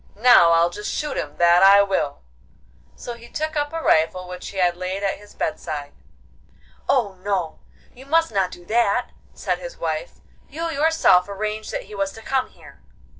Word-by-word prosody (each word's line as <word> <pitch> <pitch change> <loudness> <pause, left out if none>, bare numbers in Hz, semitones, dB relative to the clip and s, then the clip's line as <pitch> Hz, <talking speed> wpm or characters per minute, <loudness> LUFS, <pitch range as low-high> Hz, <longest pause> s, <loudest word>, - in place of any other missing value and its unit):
'Now 210 -7 +6
I'll 170 +1 +3
just 210 +4 -5
shoot 300 - -3
him, 145 0 -5
that 175 0 +5
I 200 +1 +8
will!' 150 - -2 0.7
So 240 - -7
he 235 0 -13
took 310 +1 -3
up 290 -1 -1
a 325 0 -4
rifle 175 +3 +2
which 180 0 -8
he 200 - -10
had 175 -2 +2
laid 185 +2 -4
at 195 - -1
his 205 0 -17
bedside. 150 -2 -4 1.0
'Oh 205 -8 +1
no, 185 -6 -2 0.3
you 265 +2 -15
must 325 0 +2
not 195 -3 +1
do 175 -1 -12
that,' 235 +2 +1 0.2
said - - -2
his - - -9
wife; - - -3 0.4
'you 330 +3 -4
yourself 285 - +3
arranged 215 +2 -4
that - - -4
he - - -14
was 195 -1 -2
to 225 - -12
come 265 +1 -1
here. - - -17
200 Hz, 180 wpm, -22 LUFS, 180-255 Hz, 1.0 s, I